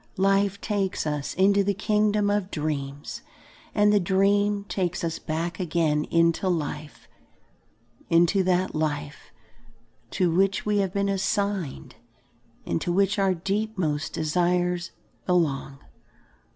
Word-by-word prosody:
Life 195 +1 +2
takes 200 -6 -1
us 150 -2 -3
into 200 +1 +4
the 200 0 0
kingdom 210 0 +1
of 205 -2 -1
dreams, 145 -3 -4 0.5
and 210 0 +4
the 205 - +5
dream 200 +2 +2
takes 180 -4 -2
us 165 -1 -2
back 165 +4 -3
again 160 -4 +1
into 170 +2 +2
life, 150 -3 -4 1.0
into 170 +3 +4
that 185 0 +1
life 145 -2 -3 0.8
to 180 -2 +1
which 195 +3 +1
we 210 -1 +1
have 195 -2 0
been 200 +1 0
assigned 195 - -2 0.7
and - - -1
to 175 - -1
which 200 +3 +2
our 195 -1 +2
deepmost 190 -5 -2
desires 175 +2 0 0.4
belong. 145 -6 0
185 Hz, 120 wpm, -25 LUFS, 160-200 Hz, 1.0 s, the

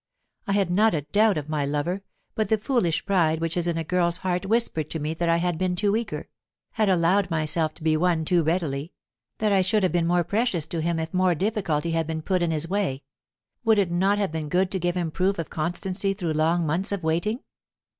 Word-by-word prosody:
I 200 - +1
had 195 -3 +1
not 210 +1 +3
a 150 - 0
doubt 205 +6 +2
of 150 -1 -4
my 155 -2 -1
lover, 150 +7 -1 0.3
but 220 - -1
the 220 - +3
foolish 210 - 0
pride 170 -5 +2
which 165 0 -2
is 175 -1 -1
in 170 -1 0
a 165 - -1
girl's 175 +1 +1
heart 180 +2 -2
whispered 205 -9 0
to - - -3
me 155 +2 -2
that 170 +1 -1
I 165 - +4
had 175 -1 -1
been 185 -1 0
too 205 +2 +2
eager 215 -10 -3 0.4
had 215 -2 +1
allowed 185 +2 +3
myself 155 -1 0
to 160 - -14
be 160 -1 +3
won 165 -1 +1
too 175 +1 +3
readily; 160 -2 -1 0.4
that 215 -1 +1
I 195 -1 +4
should 195 +3 +2
have 185 - +2
been 170 -1 +1
more 175 0 +2
precious 200 -3 0
to 160 +1 -3
him 170 +1 0
if 160 0 -4
more 185 -1 +3
difficulty 175 -5 -1
had 165 -1 0
been 160 -1 -4
put 185 0 0
in 170 - +1
his 160 0 -1
way. 180 -8 -1 0.6
Would 220 -1 +4
it 190 -4 +1
not 190 +4 +2
have 200 -5 0
been 160 -2 -4
good 185 +3 +1
to 190 - -1
give 175 0 -1
him 170 -3 -1
proof 190 +4 0
of 165 - -5
constancy 185 +5 -2
through 175 -5 -2
long 165 +2 +1
months 175 +7 0
of 200 -4 -3
waiting? 175 +9 0
175 Hz, 235 wpm, -25 LUFS, 160-195 Hz, 0.6 s, I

